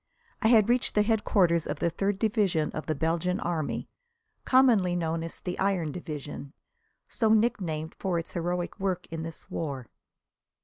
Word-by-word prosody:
I 220 - +3
had 220 -3 +6
reached 245 +1 +2
the 210 - +5
headquarters 195 -6 +2
of - - -3
the 170 - 0
Third 195 +3 -1
Division 200 -7 +1
of 155 - -6
the 155 - 0
Belgian 165 +4 0
Army, 165 -3 -2 0.6
commonly 230 -9 +4
known 165 -1 -1
as 165 0 -7
the 180 -1 -5
Iron 190 -5 +1
Division, 145 -3 -7 0.5
so 225 - 0
nicknamed 185 -8 +1
for 185 -3 0
its 165 - -5
heroic 175 +2 -2
work 185 -2 -1
in 165 -1 -4
this 165 0 -9
war. 140 -7 -4
175 Hz, 160 wpm, -28 LUFS, 160-205 Hz, 0.6 s, had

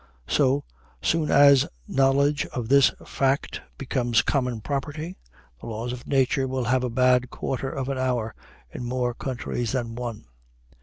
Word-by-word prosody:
So 140 0 +2 0.4
soon 160 -2 +1
as 140 -1 +6 0.2
knowledge 140 +2 +2
of 120 -4 -5
this 140 0 +6
fact 135 +1 -1 0.2
becomes 120 -4 +1
common 125 -5 0
property, 150 - -4 0.4
the - - -10
laws 115 +2 -4
of 125 - -9
nature 135 0 +2
will 130 -1 -2
have 125 +2 +1
a 125 - -1
bad 125 +1 +3
quarter 135 0 -3
of 135 -1 -4
an 135 -1 -2
hour 125 -4 -1 0.4
in - - -6
more 125 0 -1
countries 120 -2 -3
than 120 -3 -2
one. 120 -2 -6
130 Hz, 150 wpm, -25 LUFS, 120-140 Hz, 0.4 s, as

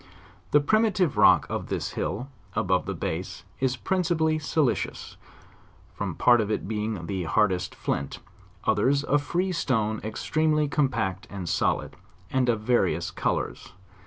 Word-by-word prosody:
The 145 - +5
primative 195 0 +2
rock - - +6
of - - -4
this - - -3
hill, 125 +5 -3 0.3
above 90 0 +1
the - - -2
base, - - -4 0.2
is 130 -1 +1
principally 160 -2 +1
silicious, 150 -3 -1 0.8
some - - -3
part 120 -2 +5
of 105 - -2
it 105 - -2
being 105 -4 -3
the 95 -1 -3
hard 100 +5 +3
est 90 -3 -3
flint, 70 - -2 0.5
others 130 +7 +2
a 145 0 +2
free 175 +6 -1
stone 110 -10 0
extremely 155 +7 +1
compact 130 -10 -1
and 95 -3 -6
solid, - - 0 0.4
and 130 -2 +2
of 115 -3 +1
various 95 -8 +1
colors. - - -2
125 Hz, 140 wpm, -26 LUFS, 105-155 Hz, 0.8 s, rock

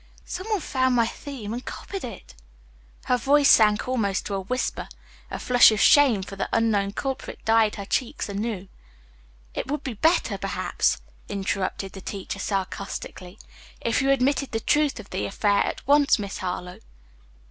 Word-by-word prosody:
"Some 370 +3 -6
one 420 -4 0
found 260 -3 +1
my 235 -1 +4
theme 235 -3 -6
and 245 +2 -5
copied 390 -1 -7
it." 200 - -9 0.7
Her 250 - +2
voice 280 +4 +4
sank 215 +2 +4
almost 215 -7 0
to 205 - -4
a 195 - -1
whisper. 255 +7 -3 0.4
A - - -4
flush 245 -1 +6
of 215 - -1
shame 265 -9 +5
for 195 - -8
the 195 - -3
unknown 205 -3 +1
culprit 270 +3 -4
dyed 225 -1 +3
her 200 - -6
cheeks 245 +4 -2
anew. 200 -1 -4 0.9
"It - - -4
would 295 0 -2
be 260 - -4
better, 320 - +1
perhaps," - - 0 0.3
interrupted 195 -1 -2
the 195 - -10
teacher 195 +1 -6
sarcastically, 195 -1 -4 0.4
"if 230 +3 0
you 270 - +1
admitted 275 0 +1
the 225 - 0
truth 295 +1 +1
of 210 - -11
the 185 - -2
affair 200 0 +2
at - - -5
once, 285 +1 +5
Miss 200 -3 -5
Harlowe." 180 -1 -5
225 Hz, 165 wpm, -25 LUFS, 200-270 Hz, 0.9 s, flush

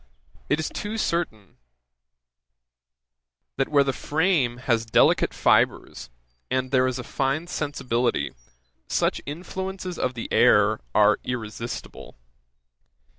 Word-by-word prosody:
it 150 - +2
is 160 - -1
too 210 +2 -5
certain, 165 - -2 2.0
that 135 - 0
where 145 -2 +4
the 135 -1 -1
frame 150 -7 +1
has 120 -3 0
delicate 115 - +3
fibres, - - +1 0.4
and 130 0 -1
there 130 -1 +3
is 130 -1 -2
a 125 - -5
fine 135 +6 -1
sensibility, 125 - -1 0.5
such - - 0
influences 185 +3 -5
of 130 0 -1
the 115 - -5
air - - +5 0.2
are 105 0 +5
irresistible. 115 -1 -6
130 Hz, 110 wpm, -25 LUFS, 120-160 Hz, 2.0 s, air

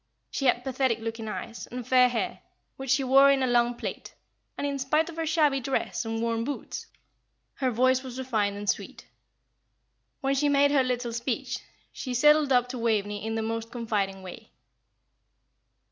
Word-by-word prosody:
She 275 - -2
had 245 0 +2
pathetic 260 -3 0
looking 225 0 -5
eyes, 215 +3 -6
and 245 -1 -7
fair 250 -1 +5
hair, 240 -2 -3 0.3
which 270 -1 -7
she 270 +1 +3
wore 270 +2 +6
in 275 -1 +3
a - - +3
long 240 -1 +2
plait, - - -6 0.4
and - - -2
in 280 -1 -2
spite 305 +5 +1
of - - -12
her 325 -1 -2
shabby 300 -4 +3
dress 265 -2 -2
and 225 0 -2
worn 230 -1 0
boots 285 +3 -5 0.7
her 260 -2 +1
voice 255 +2 +3
was 260 -1 -8
refined 215 -6 -1
and 205 0 -6
sweet. - - -2 1.2
When 270 -1 +1
she 290 +2 +2
made 285 0 +4
her 285 -2 +4
little 245 -2 -2
speech, 235 +1 -2 0.3
she 255 -2 -4
sidled 300 +2 +5
up 250 -1 +4
to 250 -1 -5
Waveney 210 -3 0
in 225 0 -2
the 225 - -1
most 225 0 -3
confiding 205 -5 -2
way. 215 +5 -10
250 Hz, 175 wpm, -27 LUFS, 225-270 Hz, 1.2 s, wore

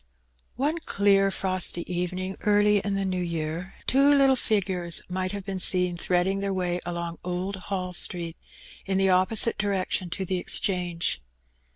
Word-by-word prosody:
One 295 +6 -1
clear 200 -8 +2
frosty 185 -2 0
evening 180 +1 -3
early 210 0 +3
in 200 0 -2
the 195 0 -1
new 185 -1 -2
year, 170 +1 -4
two 275 +2 +4
little 275 -2 +5
figures 185 -7 -1
might 185 +1 -3
have 200 -2 -6
been 195 -1 -4
seen 180 -1 +4
threading 180 +2 0
their 200 0 -2
way 180 -1 -1
along 170 -1 -4
Old 180 +2 -3
Hall 185 -1 -4
Street, 170 -2 -1 0.5
in 190 -1 0
the 195 0 +2
opposite 190 +5 +3
direction 190 -2 -1
to 190 +3 -4
the 185 0 -1
Exchange. 175 - +1
185 Hz, 155 wpm, -26 LUFS, 180-200 Hz, 0.5 s, little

